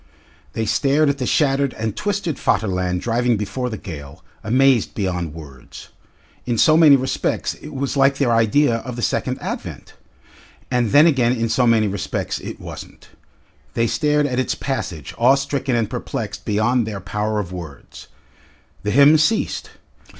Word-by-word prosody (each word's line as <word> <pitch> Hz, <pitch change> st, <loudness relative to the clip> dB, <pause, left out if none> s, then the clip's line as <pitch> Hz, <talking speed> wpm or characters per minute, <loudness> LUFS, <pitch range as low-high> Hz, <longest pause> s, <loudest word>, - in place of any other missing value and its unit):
They 110 Hz, -, -2 dB
stared 145 Hz, +5 st, +2 dB
at 140 Hz, 0 st, -1 dB
the 125 Hz, -, -2 dB
shattered 140 Hz, -2 st, +1 dB
and 110 Hz, -2 st, -3 dB
twisted 200 Hz, -7 st, -2 dB
Vaterland 90 Hz, -3 st, 0 dB
driving 120 Hz, 0 st, +1 dB
before 105 Hz, +5 st, -3 dB
the 110 Hz, -, -5 dB
gale, 70 Hz, -6 st, -9 dB, 0.2 s
amazed 130 Hz, +1 st, +2 dB
beyond 90 Hz, -6 st, -3 dB
words. 70 Hz, -5 st, -12 dB, 0.6 s
In 120 Hz, -2 st, 0 dB
so 155 Hz, +7 st, +5 dB
many 155 Hz, -3 st, +7 dB
respects 130 Hz, 0 st, -1 dB
it 150 Hz, -, -11 dB
was 140 Hz, -1 st, -3 dB
like 135 Hz, 0 st, +3 dB
their 130 Hz, -4 st, +1 dB
idea 115 Hz, +3 st, +3 dB
of 125 Hz, +1 st, -7 dB
the 120 Hz, -, -5 dB
Second -, -, -1 dB
Advent, -, -, -6 dB, 0.8 s
and 125 Hz, -3 st, +1 dB
then 145 Hz, +8 st, +6 dB
again 130 Hz, -7 st, +3 dB
in 115 Hz, -2 st, -1 dB
so 120 Hz, +2 st, +2 dB
many 110 Hz, -2 st, +3 dB
respects 100 Hz, -1 st, -3 dB
it -, -, -8 dB
wasn't. -, -, -10 dB, 0.7 s
They 115 Hz, -, +2 dB
stared 150 Hz, +4 st, +1 dB
at 130 Hz, -3 st, -1 dB
its 130 Hz, -, -1 dB
passage, 90 Hz, -, -4 dB
awe 125 Hz, +3 st, +5 dB
stricken 140 Hz, -2 st, -2 dB
and 115 Hz, -2 st, +1 dB
perplexed 105 Hz, -2 st, -5 dB
beyond 110 Hz, +3 st, +1 dB
their 105 Hz, -3 st, -5 dB
power 105 Hz, +3 st, -3 dB
of 95 Hz, -3 st, -5 dB
words. 85 Hz, -6 st, -10 dB, 0.7 s
The 105 Hz, -, -3 dB
hymn 140 Hz, +6 st, +6 dB
ceased. 215 Hz, +9 st, 0 dB
120 Hz, 160 wpm, -20 LUFS, 105-140 Hz, 0.8 s, many